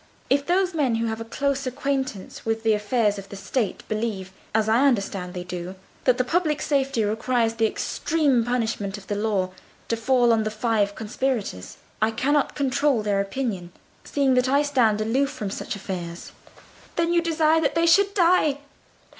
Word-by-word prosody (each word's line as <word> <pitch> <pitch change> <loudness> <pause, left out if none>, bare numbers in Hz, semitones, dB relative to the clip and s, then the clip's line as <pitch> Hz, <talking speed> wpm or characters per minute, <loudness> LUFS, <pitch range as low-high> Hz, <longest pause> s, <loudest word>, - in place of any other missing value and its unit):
If 280 +1 +2
those 365 +1 +2
men 275 -7 +1
who 230 +1 0
have 220 0 -3
a - - -2
close 275 +3 -2
acquaintance 265 -5 -3
with 225 0 -2
the 220 -1 +4
affairs 210 -1 +1
of 195 0 -11
the - - -8
State 200 +3 -2
believe, 215 -4 -3 0.2
as 220 0 +1
I 235 +6 +4
understand 195 -7 -1
they 180 - -4
do, 180 +1 -6 0.3
that 255 -2 +4
the 255 - +2
public 310 +1 0
safety 275 -5 0
requires 225 +2 0
the 225 -1 +2
extreme 280 +1 +1
punishment 225 -4 -2
of 200 - -12
the 205 - -3
law 205 -3 0 0.4
to 230 - +2
fall 240 0 +3
on 225 - +2
the 215 - -1
five 215 -2 0
conspirators, 220 - -3 0.2
I 215 - +4
cannot 275 +6 +1
control 280 -3 +1
their 200 -1 +1
opinion, 200 -5 -4 0.3
seeing 275 -2 +1
that 250 0 +2
I 280 +2 +3
stand 240 -7 +2
aloof 260 +6 +1
from 220 -8 -5
such - - -4
affairs." 175 -3 -6 0.6
"Then 335 0 +1
you 340 - +4
desire 325 -1 +2
that 290 - 0
they 335 0 +3
should 395 +4 +4
die? 340 -6 +4
235 Hz, 180 wpm, -24 LUFS, 210-280 Hz, 0.6 s, the